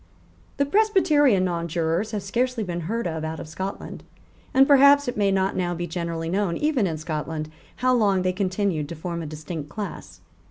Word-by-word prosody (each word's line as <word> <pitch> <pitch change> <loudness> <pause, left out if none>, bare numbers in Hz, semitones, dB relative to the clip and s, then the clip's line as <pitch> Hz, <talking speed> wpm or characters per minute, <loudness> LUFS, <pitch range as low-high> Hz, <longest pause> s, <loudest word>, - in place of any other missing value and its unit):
The 280 - +2
Presbyterian 300 - +3
nonjurors 170 +2 -1
have 210 -3 -4
scarcely 240 +3 -1
been 175 -3 -4
heard 230 +1 -1
of 160 -2 -3
out 160 0 -4
of - - -7
Scotland; 190 +5 -6 0.5
and 270 +1 +5
perhaps 280 0 +6
it 245 - -2
may 200 -2 +2
not 190 0 +1
now 175 -1 -1
be 175 +1 -3
generally 165 -1 -4
known, 185 -1 0
even 290 -9 +1
in 160 -2 -3
Scotland, 155 0 -4 0.2
how 255 0 +2
long 200 -6 +2
they 185 0 +1
continued 185 -5 -1
to 170 - -6
form 170 +1 -4
a 160 - -5
distinct 155 0 -6
class. 205 +5 -7
185 Hz, 185 wpm, -24 LUFS, 165-235 Hz, 0.5 s, perhaps